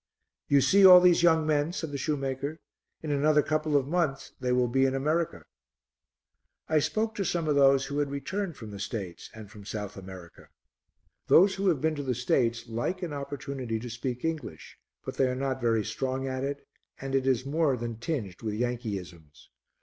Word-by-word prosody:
"You 140 -1 +4
see 195 +8 +4
all 185 -1 +11
these 180 -1 +5
young 160 -2 +4
men?" 155 +2 +1
said 160 -4 -4
the 140 - -3
shoemaker. 140 +1 -3 0.4
"In 155 - -3
another 150 +1 +3
couple 155 -1 +1
of 135 -1 -1
months 155 -4 -1
they 125 -1 -1
will 125 0 +2
be 135 +3 +2
in 135 - -1
America." 150 - -1 1.2
I 155 -1 +3
spoke 220 +8 -1
to 200 - -2
some 170 -3 -1
of 150 - +2
those 135 -1 +4
who 145 +1 -3
had 145 -1 0
returned 170 +5 -4
from 110 -3 -9
the 100 - -8
States 100 -5 -6
and 110 -2 -11
from 105 -2 -12
South 105 0 -6
America. 95 -3 -11 0.8
Those 190 +3 +6
who 195 +1 -2
have 160 -8 +2
been 160 +1 +1
to 145 - -4
the 130 -2 -1
States 120 -1 0
like 120 +12 -3
an 165 -4 -4
opportunity 140 -4 -4
to 120 +1 -7
speak 120 +3 -4
English, 155 - -5 0.3
but - - -6
they 135 - +3
are 125 - -2
not 130 0 -2
very 115 -3 +1
strong 130 +3 -3
at 130 0 -3
it, 140 +1 -4 0.3
and 135 0 -5
it 135 -1 +1
is 130 -1 +1
more 145 -2 +1
than 115 -1 -5
tinged 115 - -4
with 110 -2 -3
Yankeeisms. 100 -10 -5
135 Hz, 195 wpm, -28 LUFS, 120-155 Hz, 1.2 s, all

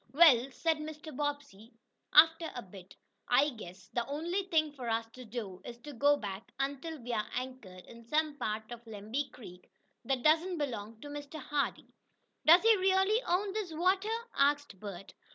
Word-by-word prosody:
"Well," 275 -5 +7
said 320 +4 0
Mr. 305 -1 -8
Bobbsey, 285 -7 -4 0.4
after 325 +2 +6
a 245 - -5
bit, 190 -1 -13 0.3
"I 275 +4 +4
guess 190 -5 -11
the 240 - +1
only 340 +7 -2
thing 310 -4 +2
for 250 -5 -5
us 225 0 0
to 255 +1 -11
do 210 -5 -6
is 235 - -8
to 295 +2 -9
go 285 +4 +4
back, 200 -3 -7
until 280 +4 -3
we 240 0 -5
are 215 - -1
anchored 250 -8 -6
in 235 0 -13
some 305 +2 +1
part 215 +1 -3
of 240 -1 -8
Lemby 225 +6 -4
Creek 180 -7 -13 0.4
that 260 -1 -1
doesn't 330 +4 +3
belong 230 -7 -4
to - - -8
Mr. 290 +1 -7
Hardee." 290 0 -2 0.5
"Does 340 +5 +9
he 450 0 +7
really 385 +4 +3
own 380 +3 0
this 405 -6 -3
water?" 375 +5 +2 0.3
asked 285 -7 +2
Bert. 195 -2 -8
280 Hz, 170 wpm, -32 LUFS, 225-315 Hz, 0.5 s, Does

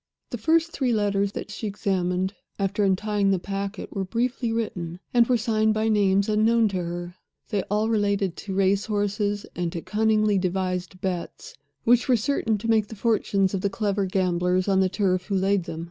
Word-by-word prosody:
The 240 - -4
first 325 +6 +2
three 255 -6 0
letters 200 -2 +1
that - - -6
she 215 +1 -4
examined, 190 -2 -1 0.2
after 200 +1 0
untying 200 +1 +1
the 195 - +3
packet, 195 +3 -5
were 195 - -1
briefly 235 +4 -1
written, 180 -7 -3
and 240 -1 +5
were 250 - +3
signed 220 -1 +1
by 220 +1 +1
names 200 -2 +3
unknown 220 +1 +3
to 195 - -3
her. 175 0 -5 0.3
They 205 -2 +1
all 210 +2 +1
related 200 -4 +1
to 195 -2 -5
race 195 +1 +2
horses, 205 -1 -1
and 175 -1 -2
to 170 - -4
cunningly 215 -1 +2
devised 185 -1 -2
bets 185 - -4 0.3
which 240 +2 +3
were 250 - +5
certain 225 -2 0
to 220 +3 -5
make 220 -2 +3
the 220 - -9
fortunes 200 -3 +1
of 190 - -1
the 200 - +1
clever 200 -1 -1
gamblers 180 0 +1
on 195 -1 +3
the 190 -1 +3
turf 185 -1 0
who 200 - -1
laid 195 -1 +1
them. 160 - -6
200 Hz, 190 wpm, -25 LUFS, 190-220 Hz, 0.3 s, and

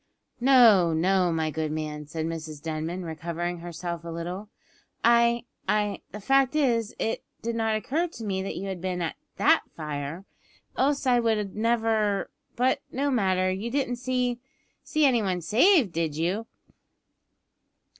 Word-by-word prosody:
"No, 235 -10 +6
no, 180 +2 +2
my 160 -1 0
good 155 0 -2
man," 150 -1 -4
said 160 +1 -3
Mrs 160 -2 -5
Denman, 160 +4 -4
recovering 170 +2 -4
herself 170 0 -5
a 170 - -7
little. 175 +5 -5 0.6
"I 235 0 +4 0.3
I 210 0 +1
the 210 - -7
fact 270 +5 +3
is, 235 -7 +1
it 225 - -2 0.2
did 230 0 -2
not 225 -1 +1
occur 295 - -1
to 235 -9 -10
me 190 -2 -1
that 195 - -4
you 195 - -4
had 190 -3 -5
been 180 -1 -2
at 165 - -3 0.2
that - - +5
fire, 150 +3 -5 0.5
else 280 +1 +1
I 250 -2 +4
would 215 -4 0
never 220 -2 +1 0.2
but 255 +2 +2
no 280 +2 0
matter. 185 -6 +2
You 195 +5 -3
didn't 250 -2 -1
see 250 -1 -1 0.4
see 310 -2 +2
any 250 -4 +4
one 185 -3 -1
saved, 240 - +4
did 160 -3 -1
you?" 190 +8 -1
195 Hz, 155 wpm, -26 LUFS, 170-235 Hz, 0.6 s, No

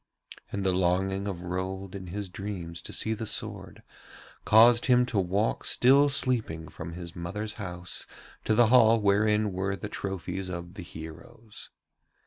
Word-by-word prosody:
And 100 - -3
the 95 -1 +2
longing 95 +2 +1
of 90 -3 -4
Rold 95 +1 -4
in 95 -2 -7
his 100 +3 -5
dreams 90 -3 -6
to - - -8
see 110 - 0
the 110 0 -5
sword - - -4 0.6
caused 115 +2 +6
him 125 -1 +5
to 110 -4 -1
walk 95 +4 0
still 140 +3 +4
sleeping 110 - 0
from 80 +2 -8
his 85 -1 -8
mother's 105 +5 -4
house 90 -2 -5 0.4
to 110 - +2
the 115 0 +5
hall 115 -2 +6
wherein 105 +1 +2
were 95 +1 -1
the 105 - -7
trophies 95 -1 -4
of 85 0 -6
the 100 - -8
heroes. 85 +7 -11
100 Hz, 155 wpm, -28 LUFS, 90-110 Hz, 0.6 s, caused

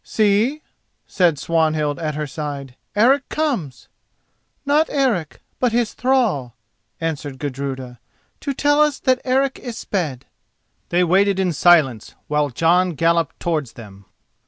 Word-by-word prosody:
"See," 220 +8 +1 0.4
said 175 -6 +2
Swanhild 155 -1 0
at 155 -3 -3
her 150 0 -2
side, 140 -3 -6 0.2
"Eric 260 +6 +3
comes!" 245 - -2 0.8
"Not 295 +3 +2
Eric, 240 - -1 0.2
but 250 -3 +1
his 235 -2 0
thrall," 220 - 0 0.4
answered 150 -4 -4
Gudruda, 130 -3 -5 0.4
"to 280 - -3
tell 290 +2 +3
us 300 -2 +2
that 255 -1 +1
Eric 265 +1 +1
is 240 -3 -7
sped." 150 -10 -3 0.6
They 175 +1 +2
waited 195 +3 +3
in 185 -3 +1
silence 150 -8 +3
while 150 -1 +1
Jon 170 +7 +2
galloped 165 0 +1
towards 155 -8 -2
them. 100 -4 -13
170 Hz, 130 wpm, -20 LUFS, 145-240 Hz, 0.8 s, Eric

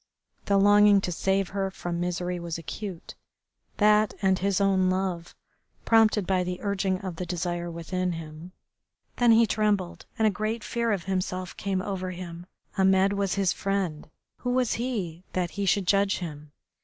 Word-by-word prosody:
The 200 - +3
longing 205 0 +6
to 180 - -2
save 195 +2 0
her 195 -1 -2
from 175 -2 -4
misery 180 0 -2
was 170 -1 -4
acute, 165 +4 -7 0.6
that, 210 0 +4
and 190 -2 +2
his 195 0 +1
own 190 -2 +3
love, 185 -2 -2 0.5
prompted 220 -3 +4
by 185 0 +1
the 180 0 -3
urging 195 -2 0
of 185 -3 -6
the 180 - -3
desire 175 0 -3
within 180 +2 -2
him. 160 +1 -8 0.7
Then 240 -1 +5
he 230 +1 +6
trembled, 210 -5 -1
and 220 - +2
a - - +3
great 215 +3 -3
fear 235 -1 -1
of 195 -4 -1
himself 185 -1 -3
came 190 -1 -2
over 185 -2 -3
him. 175 -1 -8 0.3
Ahmed 190 +1 +4
was 200 -1 0
his 195 -3 +2
friend. 190 -7 -2 0.3
Who 245 - -4
was 250 -1 +1
he 200 -9 -3
that 180 -2 -1
he 200 -1 -3
should 195 +1 +2
judge 200 +1 +2
him? 150 -4 -7
190 Hz, 165 wpm, -27 LUFS, 175-200 Hz, 0.7 s, longing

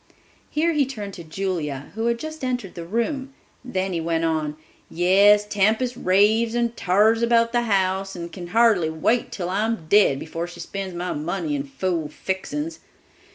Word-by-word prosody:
Here 330 +3 +1
he 290 -4 +2
turned 210 -7 -6
to 170 - -8
Julia, 160 -5 -4
who 225 +2 -1
had 235 0 +1
just 310 +2 -7
entered 245 -7 -2
the 170 -1 -8
room. 265 - -2 0.3
Then 190 -6 -2
he 165 - -1
went 165 0 0
on: 155 -2 -1 0.3
"Yes, 200 +4 +5
Tempest 220 +5 +1
raves 220 +3 +3
and 235 -1 0
tars 215 +5 +3
about 230 0 +3
the 240 0 +2
house 195 0 +1
and 170 -1 -6
can 175 -2 -7
hardly 210 -4 +3
wait 190 +10 0
till 180 -2 -4
I'm 210 -2 -1
dead 200 -9 +5
before 165 +4 -5
she 175 - -11
spends 195 -2 -5
my 180 +1 -3
money 160 +1 -3
in 140 0 -3
fool 165 +2 -2
fixin's. 295 - -4
195 Hz, 170 wpm, -23 LUFS, 170-230 Hz, 0.3 s, Yes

